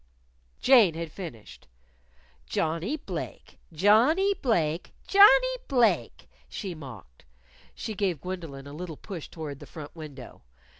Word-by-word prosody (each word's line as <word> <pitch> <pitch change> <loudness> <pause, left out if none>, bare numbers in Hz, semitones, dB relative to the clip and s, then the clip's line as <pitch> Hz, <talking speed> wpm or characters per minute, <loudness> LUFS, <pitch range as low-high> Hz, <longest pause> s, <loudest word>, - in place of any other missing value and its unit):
Jane 230 -11 +6
had 165 -1 -5
finished. 140 - -10 0.8
"Johnnie 165 - -1
Blake! - - -7
Johnnie 235 - +4
Blake! 175 - -1
Johnnie - - +6
Blake!" 245 -5 +1 0.2
she 195 -4 -5
mocked. 115 - -12 0.5
She 220 - -5
gave 190 -6 -1
Gwendolyn 165 -7 -6
a 140 - -10
little 165 -1 -7
push 180 -7 -8
toward 150 -4 -7
the - - -11
front 150 -1 -10
window. 145 -6 -10
170 Hz, 115 wpm, -27 LUFS, 150-225 Hz, 0.8 s, Jane